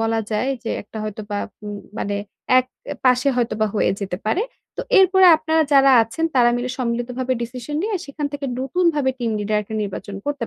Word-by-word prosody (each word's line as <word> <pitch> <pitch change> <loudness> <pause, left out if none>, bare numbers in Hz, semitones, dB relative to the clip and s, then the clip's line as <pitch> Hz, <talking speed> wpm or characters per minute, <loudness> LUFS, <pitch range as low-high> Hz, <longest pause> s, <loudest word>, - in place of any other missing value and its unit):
বলা 225 0 +1
যায় 230 +5 0
যে - - -2
একটা 220 +2 -10
হয়তোবা 210 -1 -5 0.3
উম 205 0 -5 0.2
মানে 205 0 -2 0.4
এক 255 - +1 0.4
পাশে 250 +1 +4
হয়তোবা 225 -3 +1
হয়ে - - +2
যেতে 190 -2 -3
পারে। 355 - +1 0.3
তো - - -2 0.2
এরপরে 380 0 +6
আপনারা 315 0 +1
যারা 275 -1 +6
আছেন 230 +9 -3
তারা 240 -2 +5
মিলে 250 +1 -3
সম্মিলিতভাবে 250 +1 -2
decision 250 +5 -5
নিয়ে, 425 +1 -1
সেখান 290 +1 -4
থেকে 285 -1 -4
নতুনভাবে 290 0 +1
team 235 -2 -1
leader 210 +1 -1
একটা 220 +2 -8
নির্বাচন 200 0 -6
করতে 285 -5 -2
250 Hz, 180 wpm, -21 LUFS, 220-285 Hz, 0.4 s, এরপরে